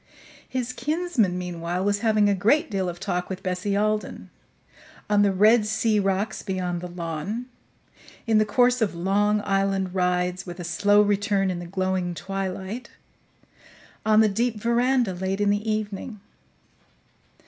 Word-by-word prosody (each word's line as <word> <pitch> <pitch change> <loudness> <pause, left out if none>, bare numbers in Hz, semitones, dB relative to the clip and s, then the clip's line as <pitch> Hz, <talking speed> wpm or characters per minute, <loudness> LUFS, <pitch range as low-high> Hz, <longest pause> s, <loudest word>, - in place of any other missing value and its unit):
His 255 -1 -3
kinsman, 300 - 0
meanwhile, 175 0 -3
was 205 0 +1
having 215 -2 +3
a 200 - +3
great 235 - +2
deal 190 -2 -1
of 175 0 -7
talk 180 -1 -2
with 190 0 -6
Bessie 190 +2 -1
Alden 215 +1 -2 0.8
on 205 0 +3
the 200 -1 +4
red 210 +3 +4
sea 215 0 +1
rocks 195 +2 -1
beyond 180 -3 -3
the 180 - -5
lawn; 175 +6 -4 0.8
in 220 -2 +3
the - - +5
course 245 +3 +2
of 205 -5 0
long 205 +4 +1
island 195 -1 0
rides, 180 0 0
with 175 -1 -9
a - - -5
slow 205 +4 +3
return 200 -1 +1
in 175 - -4
the 175 - -7
glowing 185 -1 -1
twilight; 195 +5 -5 1.1
on 215 0 +5
the 220 - +5
deep 230 +3 0
veranda 235 -1 +2
late 190 +2 -3
in 205 0 +2
the 210 +2 -1
evening. 215 +1 -4
200 Hz, 150 wpm, -24 LUFS, 185-215 Hz, 1.1 s, the